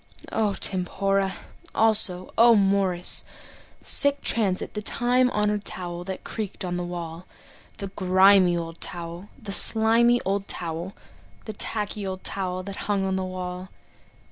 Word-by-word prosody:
O 210 -3 -1
tempora! 195 +1 +1 0.4
Also, 210 -5 +3
O 235 0 +6
mores! 195 -3 +1 0.6
Sic 285 -1 +5
transit 195 -5 -1
The 210 - -5
time 250 +3 +1
honored 210 -2 -1
towel 175 -2 -6
that 190 0 -7
creaked 210 -3 -6
on 175 -1 -3
the 180 - -3
wall. 170 0 -7 0.5
The 200 - -6
grimy 190 -1 +4
old 165 0 -7
towel, 175 +1 -4
the 215 -5 -8
slimy 230 +3 +4
old 195 +1 -2
towel, 170 +3 -5 0.5
The 215 - -6
tacky 210 -1 -3
old 190 0 -6
towel 185 -1 -2
that 195 0 -8
hung 200 -2 0
on 190 0 -1
the 190 - -2
wall. 185 0 -6
195 Hz, 140 wpm, -24 LUFS, 180-210 Hz, 0.6 s, O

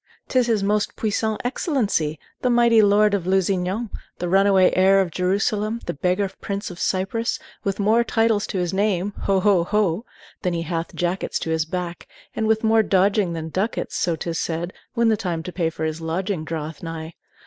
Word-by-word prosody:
'T 255 - +3
is 245 - +2
his 220 -4 +1
Most 210 +1 0
Puissant 220 0 -1
Excellency, 220 - 0 0.2
the 250 - +1
mighty 235 -2 +5
Lord 205 0 +4
of 185 -3 -1
Lusignan, 190 +3 0 0.3
the 175 - -3
runaway 195 0 +4
Heir 190 +1 +5
of 185 -3 0
Jerusalem, 205 +5 0
the - - -2
beggar 180 +6 0
Prince 200 -1 -4
of 175 - -10
Cyprus, 195 +5 -1 0.3
with 195 0 -2
more 220 +4 +3
titles 225 -2 +1
to 195 - -3
his 180 -1 -1
name 200 -1 0
ho 195 -1 +3
ho, 190 -3 +3
ho! 205 0 +1 0.4
than 180 -3 0
he 165 - -2
hath 165 0 -4
jackets 175 +2 -1
to 160 - -3
his 160 -1 +1
back; 175 +1 -5 0.3
and 220 - 0
with 220 0 +2
more 220 0 +5
dodging 195 -2 +2
than 160 -1 -4
ducats, 195 +7 -2
so 175 -3 +1
't 170 +2 -4
is 165 - -2
said, 170 +2 -3 0.2
when 235 -1 +3
the 220 - +4
time 175 -6 -3
to 180 - -6
pay 170 -3 0
for 160 -1 -6
his 160 +1 -2
lodging 170 +2 -2
draweth 155 -1 -5
nigh. 165 -1 -6
190 Hz, 195 wpm, -23 LUFS, 170-215 Hz, 0.4 s, mighty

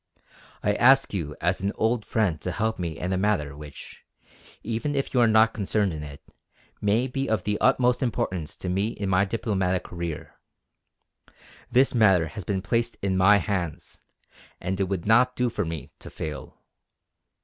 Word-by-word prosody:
I 105 - +2
ask 135 +4 +4
you 75 -6 -3
as 90 +2 0
an 100 +1 -1
old 110 0 0
friend 95 -9 0
to 90 - -3
help 110 +4 -1
me 85 -3 -3
in 90 +1 -2
a 95 - 0
matter 95 -9 0
which, 75 -1 -11 0.6
even 115 +6 -2
if 135 - -2
you 125 - +3
are 120 - +5
not 110 0 +4
concerned 100 -2 0
in 75 - -6
it, 70 -2 -10 0.6
may 105 +4 +2
be 135 0 -3
of 110 -4 0
the 105 0 -1
utmost 125 -1 +3
importance 95 - -2
to - - -7
me 95 +3 0
in 100 -3 -4
my 95 +1 +3
diplomatic 95 -4 -1
career. 85 -3 -6 1.3
This 130 +2 +4
matter 95 -9 +4
has 105 - -7
been 95 +1 -2
placed 115 +2 -1
in 95 -1 +1
my 95 +3 +6
hands, 90 -6 -4 0.6
and 95 +2 -3
it 95 - +2
would 95 -2 -3
not 125 +4 +4
do 125 -1 0
for 105 -3 -2
me 80 -2 -6
to - - -10
fail. 75 -1 -7
100 Hz, 175 wpm, -25 LUFS, 90-115 Hz, 1.3 s, my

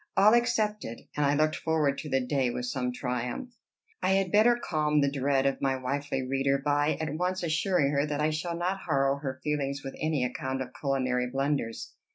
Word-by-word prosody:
All 205 +3 +7
accepted, 215 - 0
and 150 - +1
I 145 - +2
looked 155 +1 +2
forward 155 -4 +1
to 150 - -6
the 135 -1 +2
day 135 -2 +1
with 125 +1 -3
some 125 0 -2
triumph. 125 - -3 0.5
I 185 +1 +2
had 195 -2 +1
better 220 +4 +5
calm 150 -9 0
the 140 -1 +2
dread 135 -1 +1
of 135 - 0
my 135 -1 +1
wifely 135 0 -2
reader 135 +1 +1
by 145 +2 +1
at 155 -2 -3
once 180 +3 -1
assuring 160 -2 +1
her 140 +1 +1
that 145 -1 -2
I 155 +1 +2
shall 170 +2 -3
not 185 +3 -1
harrow 135 -2 +2
her 135 -2 -5
feelings 140 -2 -2
with 135 - -6
any 155 -5 +1
account 130 +1 -3
of 125 - -10
culinary 130 -3 0
blunders. 135 -3 -2
145 Hz, 200 wpm, -28 LUFS, 135-160 Hz, 0.5 s, All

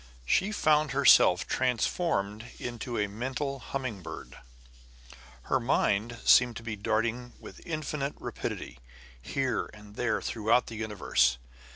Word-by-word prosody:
She 190 - +2
found 155 -7 +2
herself 135 -9 +6
transformed 120 - -1
into 120 0 -5
a 105 - +2
mental 130 +6 -3
humming 125 -4 -4
bird. - - -9 1.1
Her - - +1
mind 115 +4 +1
seemed 125 -2 +6
to - - -8
be 115 -1 -4
darting 115 +4 -1
with - - -12
infinite 150 -3 -3
rapidity, - - -5 0.4
here 130 - -1
and 105 0 -14
there 120 -2 0
throughout 115 +2 +1
the 115 - -8
universe. 105 - +1
120 Hz, 125 wpm, -29 LUFS, 105-135 Hz, 1.1 s, herself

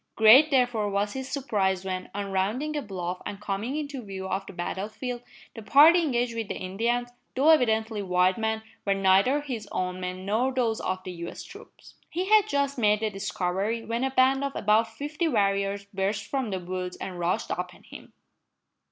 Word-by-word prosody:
Great, 235 +8 +8
therefore, 245 -6 +2
was 205 +1 -1
his 265 0 -5
surprise 195 -9 -1
when, 185 -1 -4
on 200 -1 -3
rounding 220 +11 -1
a 295 - -1
bluff 180 -5 -5
and 200 - -6
coming 210 +6 -3
into 285 -3 -4
view 195 -3 -6
of 190 +1 -2
the - - -7
battle 190 +3 -4
field, 245 +2 -5 0.3
the 225 - -8
party 305 +10 +7
engaged 245 -6 0
with 225 -2 -3
the - - -4
Indians, 235 +6 -1 0.3
though 275 +5 +4
evidently 220 -6 +2
white 180 -1 +2
men, 220 0 -2 0.2
were 200 -1 +1
neither 195 +9 +3
his 240 -7 -5
own 180 0 -2
men 185 0 -5
nor 225 +6 +1
those 240 -4 0
of 185 0 -3
the 185 - -6 0.2
US - - -8
troops. - - -14 0.2
He 360 +3 -2
had 430 -1 +6
just 280 -6 0
made 210 -1 +3
the 220 -1 0
discovery, 195 +3 -2
when 230 +2 -2
a 265 - +1
band 265 +1 +3
of 275 -1 -3
about 215 +2 +3
fifty 295 +8 -3
warriors 200 -5 0
burst 195 +2 -1
from 265 -5 -2
the 190 -2 -2
woods 180 0 -5
and 180 -2 -6
rushed 175 +1 -1
upon 180 0 -5
him. - - -13
215 Hz, 190 wpm, -27 LUFS, 190-255 Hz, 0.3 s, Great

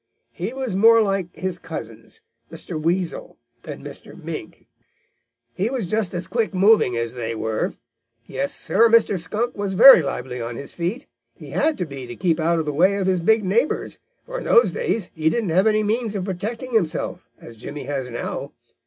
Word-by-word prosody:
He 185 +6 -4
was 260 -6 -4
more 230 +3 +6
like 195 -3 -1
his 185 -1 -3
cousins, 450 - -9 0.3
Mr. 160 -4 -6
Weasel 175 +2 -2 0.3
and - - -8
Mr. - - -10
Mink. - - -8 0.9
He 195 - -1
was 245 -7 -3
just 215 -5 -1
as 175 - -2
quick 225 -4 -1
moving 195 - +4
as 115 0 -2
they 115 -2 -4
were. 110 0 -2 0.5
Yes, 135 +3 -3
Sir, 230 0 +3
Mr. 220 -4 +4
Skunk 225 +8 -3
was 200 -1 -3
very 265 +1 +9
lively 130 -3 -4
on 115 +1 -5
his 140 +3 -8
feet. 180 - -3 0.3
He - - -11
had 315 -1 +1
to 180 - -2
be 135 -4 -8
to 120 - -8
keep 170 0 0
out 165 +1 +2
of 160 - -1
the 150 - -2
way 185 +7 +3
of 200 -2 -1
his 185 -1 +2
big 220 +4 +3
neighbors, 230 +10 0 0.3
for - - -5
in - - -8
those 475 -1 +5
days 230 - -2
he 160 0 +1
didn't 225 0 -1
have 185 +6 +3
any 215 0 +3
means 220 0 -1
of 190 -2 -2
protecting 225 +7 -4
himself, 185 -9 -1
as 115 - -12
Jimmy 140 +6 -7
has 135 -2 -3
now. 120 - -5
185 Hz, 190 wpm, -22 LUFS, 155-225 Hz, 0.9 s, very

